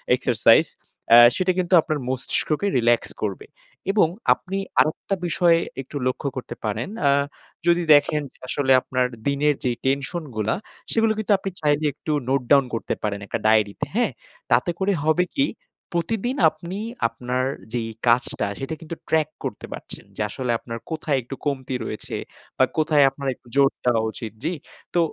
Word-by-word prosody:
Exercise. - - +4 0.5
অ্যা 120 - +10 0.2
সেটা 185 0 +2
কিন্তু 180 0 -1
আপনার 155 -1 -2
মস্তিষ্ককে 150 +7 -1
রিল্যাক্স 120 -1 +2
করবে। 425 - -3 0.5
এবং 200 -5 +4 0.3
আপনি 195 +1 -6 0.2
আরেকটা 155 +5 +1
বিষয় 170 0 +4 0.2
একটু 135 - -13
লক্ষ্য 130 +2 -2
করতে 130 - -6
পারেন। 110 - -2 0.2
আ - - +6 0.6
যদি 175 0 +4
দেখেন 150 +1 +4
যে - - -28
আসলে 135 0 0
আপনার 130 -1 0 0.2
দিনের 140 +1 +2
যে 125 - +1
টেনশন 140 +6 0
গুলা 110 0 0 0.4
সেগুলো 225 -1 +3
কিন্তু 215 -1 -1
আপনি 195 - -4
চাইলে 150 0 +2
একটু 155 - -5 0.2
নোট 135 0 +2
ডাউন 140 -2 +6
করতে 115 - -2
পারেন 100 -1 -1
একটা 115 - -3
ডায়রিতে। 110 -2 +2
হ্যাঁ? 240 +1 +2 0.4
তাতে - - +3
করে 195 +1 +2
হবে 165 +3 +3
কি 275 - +3 0.5
প্রতিদিন 225 +8 -1
আপনি 170 +5 -8 0.3
আপনার 125 +1 -3 0.3
যেই 115 -2 -2 0.2
কাজটা 120 -3 +2
সেটা 135 +4 -4
কিন্তু 165 +1 -6
ট্র্যাক 155 -1 +2
করতে - - -5
পারছেন। - - -8
যে - - -4
আসলে 125 +1 -2
আপনার 115 -1 -6
কোথায় 155 -3 0
একটু 125 +3 -7
কমতি 135 -2 -2
রয়েছে? 105 - -5 0.4
বা - - +5
কোথায় 155 -2 +4
আপনার 135 +1 -7
একটু 120 - -25
জোর 140 -1 +6 0.2
দেওয়া 120 -2 +3
উচিত? 110 -1 -7
জ্বি? 170 +3 0 0.4
তো 175 - +3
145 Hz, 160 wpm, -23 LUFS, 125-170 Hz, 0.6 s, অ্যা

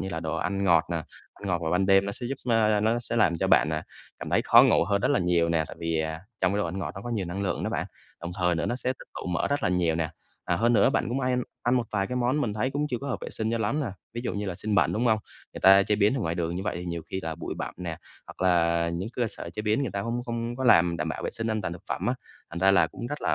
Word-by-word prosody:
như 95 - -3
là 80 -3 -4
đồ 80 0 -2
ăn 100 +4 -1
ngọt 85 -4 +5
nè. 85 - 0 0.4
Ăn 100 - -10
ngọt 90 -3 +1
vào 80 - -1
ban 95 +2 +2
đêm 95 0 +5
nó 100 - -2
sẽ 120 - -6
giúp, 135 +3 -3 0.2
ơ 110 -2 +3
nó 115 +3 +1
sẽ 120 0 -4
làm 90 -7 +3
cho - - 0
bạn, 75 - +4
à, 80 0 -2 0.4
cảm - - -6
thấy - - +3
khó - - +7
ngủ - - +4
hơn 100 +2 +1
rất - - +1
là - - +3
nhiều 85 -1 +2
nè. 80 -1 +1
Tại - - -9
vì, 85 -1 -1
à, 80 +1 -3 0.2
trong 95 0 +2
cái 100 - 0
đồ 105 - +1
ăn 90 +3 -4
ngọt 95 - -3
nó 95 - -7
có 120 - -5
nhiều 105 -6 -1
năng 90 +3 -4
lượng 100 - -1
đó - - -1
bạn, - - -2 0.3
đồng 85 +1 -5
thời 90 -1 +2
nữa 85 - -1
nó 120 - -1
sẽ 130 0 -1
tích - - -15
tụ - - -6
mỡ 90 -1 0
rất 145 0 0
là - - +2
nhiều 90 -2 +1
nè. 80 -1 -1 0.3
À, 85 - 0
hơn 120 +4 +3
nữa 115 - +5
bạn - - 0
cũng 125 +3 -1
hay 125 -1 +1 0.3
ăn 120 +1 +2
một 120 -2 +1
vài 100 -2 +1
cái 125 - -4
món 125 +4 +1
mình 110 -8 -1
thấy 110 +5 0
cũng 145 +2 -1
chưa 125 - -2
có 140 - -6
hợp 130 - -2
vệ - - -6
sinh 110 0 -2
cho 115 - 0
lắm 115 +7 0
nè, 145 - -1 0.3
ví 120 - -3
dụ - - -2
như 105 0 -3
là 95 - -3
xiên 105 +3 -2
bẩn, 100 - +3
đúng 120 +3 0
hông? 110 -1 +4 0.3
Người - - -8
ta 95 +1 +7
chế 105 +1 +1
biến 105 +3 +3
ở 135 - -1
ngoài 80 -5 -1
đường 85 0 -2
như 95 - -3
vậy 90 - -2
thì 90 - -5
nhiều 85 -1 -4
khi 95 - -2
là 80 0 -3
bụi 85 - -5
bặm - - -4
nè, 85 -2 -5 0.3
hoặc - - -12
là 85 -1 +3
những 85 +5 -3
cơ 120 - +1
sở 85 - -7
chế 105 +4 -5
biến 110 +5 +1
người 130 - -2
ta 100 - -2
không 120 +3 -2
không 115 0 -3
có 130 - -3
làm 85 -7 +5
đảm 80 0 -2
bảo 80 - -4
vệ - - -2
sinh 115 - -3
an 110 0 0
toàn 85 - -3
thực 85 - -9
phẩm - - -2
á, - - +2 0.4
thành 85 - -5
ra 95 +2 +5
là 95 - +5
cũng 120 - -7
rất 145 +4 -5
là, - - +1
100 Hz, 335 wpm, -27 LUFS, 85-115 Hz, 0.4 s, khó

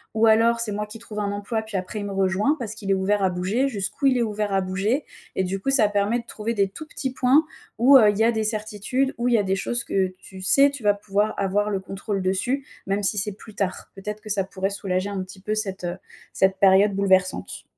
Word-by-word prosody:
Ou 220 +1 +4
alors 225 +1 +4
c'est 230 -2 -2
moi 210 +1 -3
qui 215 +2 -9
trouve 220 -2 -7
un 200 -1 -1
emploi 205 +2 -3
et - - -5
puis 220 -2 -4
après 190 +4 -4
il 205 - -4
me 200 - -4
rejoint 195 +8 +1
parce 220 -4 -4
qu'il 210 -2 -7
est 195 - +4
ouvert 200 +2 +1
à 190 - +3
bouger. 190 +9 0
Jusqu'où 215 +4 -1
il 260 -2 +3
est 240 - +2
ouvert 210 -2 -2
à 195 - +2
bouger? 195 +9 -1 0.3
Et 190 - +1
du 190 +1 -2
coup, 275 - -1
ça 265 -6 +5
permet 205 +3 +1
de 235 - -10
trouver 230 0 -4
des 200 -2 +2
tout 310 +11 -10
petits 265 -3 -4
points 265 +5 +4 0.3
où, 255 +5 +6
heu, 215 -5 +6
il 205 - 0
y 220 - +3
a 230 - +4
des 220 -1 -1
certitudes, 215 +5 -1
où 240 - 0
il 245 - +3
y - - +5
a 205 - +2
des 190 0 0
choses 235 +5 -2
que 190 -1 0
tu 190 0 -12
sais, 275 +9 +5
tu 280 -2 -8
vas 205 -1 +4
pouvoir 205 +1 -1
avoir 200 +2 0
le 200 -2 -1
contrôle 195 +1 -4
dessus, 245 +9 -1 0.2
même 200 +1 0
si 205 +2 +1
c'est 205 +1 -2
plus 215 +2 -14
tard. 195 -3 -3
Peut-être 210 +2 -6
que 215 - -11
ça 200 -2 +1
pourrait 190 +1 -3
soulager 195 -1 -2
un 200 -2 -3
petit 185 +1 -12
peu 210 +2 -2
cette, 195 -4 -3
heu, 175 +1 -3 0.4
cette 190 0 +2
période 195 +1 +5
bouleversante. 190 -1 +1
205 Hz, 265 wpm, -24 LUFS, 195-225 Hz, 0.4 s, où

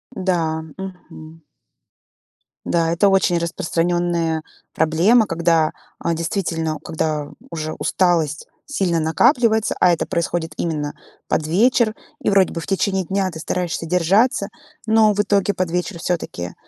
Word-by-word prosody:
Да, 165 -4 0 0.2
мгм. 165 -4 -10 1.2
Да, 165 -1 +1
это 195 +4 +3
очень 190 -2 +3
распространенная 170 -1 -1 0.3
проблема, 175 +9 +4
когда, 165 -3 +2 0.3
а, 170 - -1
действительно, 165 -2 -2
когда 155 -2 -2 0.2
уже 155 -1 -4
усталость 165 -5 0 0.2
сильно 185 - 0
накапливается, 220 - +2
а 180 - +5
это 170 - 0
происходит 170 -2 -2
именно 150 -3 -2 0.3
под 155 - 0
вечер, 220 +5 +3 0.3
и - - +1
вроде 195 -2 +3
бы 165 - -4
в - - -9
течение 195 -1 0
дня 190 +1 -1
ты 160 - -8
стараешься 170 0 -2
держаться, 195 +6 +2 0.4
но 220 -1 +4
в 205 - -5
итоге 205 -1 +2
под 180 -2 -2
вечер 180 +1 -2
всё-таки, 160 - -3
175 Hz, 130 wpm, -20 LUFS, 160-195 Hz, 1.2 s, а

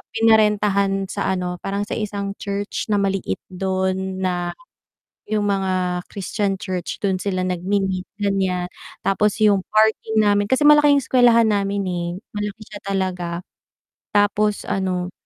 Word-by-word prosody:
pinarentahan 210 -3 +3
sa 200 - -2
ano 180 -1 -3
parang 200 +2 -2
sa 205 - -9
isang 200 -1 -3
church 200 0 -3
na 210 - +1
maliit 195 - 0 0.2
dun 190 0 -2
na 175 -1 -1 0.8
yung 210 -1 +1
mga 185 -2 0
Christian 200 0 -2
church 185 -2 -4
dun 190 -2 +1
sila 185 -2 -1
nag-mi-meet 185 +1 -1
gan'yan. 190 -3 0 0.4
Tapos 205 +1 +2
yung 200 -2 +5
parking 220 0 +3
namin 205 0 +2
kasi 260 +3 +2
malaki 295 0 +7
yung 280 - 0
eskwelahan 240 -2 +5
namin, 200 0 0
eh, 175 -1 -2 0.3
malaki 210 +1 -4
siya 205 -1 -10
talaga 180 -3 -2 0.7
tapos 205 0 +2
ano 185 -2 -1
195 Hz, 135 wpm, -21 LUFS, 185-210 Hz, 0.8 s, malaki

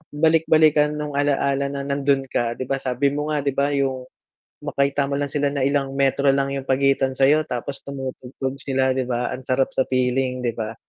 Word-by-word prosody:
balik-balikan 155 -1 +4
nung 150 0 -4
ala-ala 140 -1 +1
na 140 0 -4
nando'n 140 -1 +1
ka. 120 0 -1
'Di - - -4
ba 135 0 0
sabi 130 +2 0
mo 150 +1 -3
nga, 150 -2 -1
'di 140 - +1
ba 140 +2 0
yung 130 -2 -1 0.5
makita 140 0 0
mo 140 - -1
lang 145 0 -2
sila 145 -1 +1
na 140 -2 -1
ilang 140 -1 0
metro 140 0 +2
lang 140 0 +1
yung 135 -1 -4
pagitan 135 0 +2
sa 135 - +4
'yo 150 +3 +4
tapos 125 +3 -4
tumutugtog 135 -1 -6
sila 130 -1 +1
'di 130 -1 -2
ba, 120 0 -1
ang 130 - -6
sarap 130 +1 0
sa 130 - +1
feeling 125 0 0
'di 120 - 0
ba? 110 0 -3
135 Hz, 205 wpm, -22 LUFS, 130-140 Hz, 0.5 s, balik-balikan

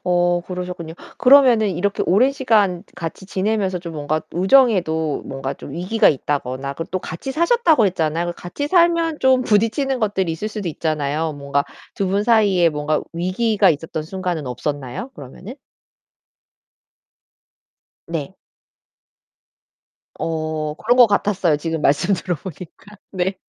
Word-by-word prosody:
어 175 -1 +2
그러셨군요. 180 -3 -6 0.2
그러면 260 -3 +6
이렇게 200 0 -1
오랜 240 +9 +4
시간 210 -10 +1
같이 170 +3 -6
지내면서 195 -1 -1
좀 170 -1 -8
뭔가 155 +1 -2
우정에도 180 - +2
뭔가 135 0 -4
좀 - - -10
위기가 185 +7 +2
있다거나 140 -1 -2
그리고 165 - -6
또 185 - -1
같이 170 +8 -6
사셨다고 335 - +3
했잖아요. 170 -1 -1
같이 185 +11 -5
살면 335 -2 +3
좀 260 -1 +4
부딪히는 230 +5 +1
것들이 195 -6 0
있을 185 +7 -4
수도 210 -4 -5
있잖아요. 155 0 -2
뭔가 140 0 -1 0.3
두 195 - 0
분 205 +1 +1
사이에 205 -7 +4
뭔가 150 0 -1
위기가 195 +4 +1
있었던 160 +1 -3
순간은 175 -2 -4
없었나요? 135 - -4
그러면은? 150 - -10 2.5
네. - - -5 1.8
어, 155 -2 -3
그런 235 +9 +1
것 245 -2 +8
같았어요. 195 -6 +1
지금 160 +1 -3
말씀 155 +7 +2
들어보니까. 180 +3 -7 0.2
네. 190 0 -1
180 Hz, 300 characters per minute, -20 LUFS, 160-215 Hz, 2.5 s, 것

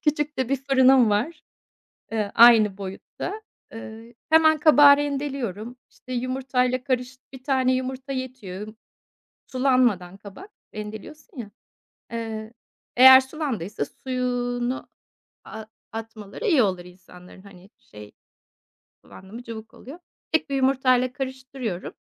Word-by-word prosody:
Küçük 295 -1 -1
de 260 -2 -1
bir 275 - +1
fırınım 260 -3 +4
var, 305 +10 -2 0.7
eee, 210 -2 -2
aynı 220 -4 +6
boyutta. 200 - -7 0.3
Eee, 225 +1 -11 0.2
hemen 315 -1 +5
kabağı 290 -2 +7
rendeliyorum, 270 -6 -4
işte, 255 - -12
yumurtayla 255 0 -1
karış 255 -1 -3
1 265 -1 -12
tane 260 -2 +1
yumurta 260 +1 -4
yetiyor. 220 -6 -7 0.7
Sulanmadan 250 -9 +1
kabak 205 - -12 0.3
rendeliyorsun 220 - -9
ya. 210 -4 -7 0.6
Eee, 220 -1 -6 0.4
eğer 260 +1 +9
sulandıysa 250 - -4
suyunu, 245 - -3 0.6
aaa, 220 0 -9 0.3
atmaları 225 - -8
iyi 315 - +4
olur 185 -3 -1
insanların. 180 0 -16
Hani, 195 0 -16
şey, 105 0 -14 0.9
kullandın 190 +3 -15
mı 240 - -8
cıvık 225 -2 -10
oluyor. 285 +7 -12 0.3
Tek 320 -2 0
bir 275 - -1
yumurtayla 255 -1 +2
karıştırıyorum 260 -7 -6
250 Hz, 115 wpm, -24 LUFS, 215-270 Hz, 0.9 s, eğer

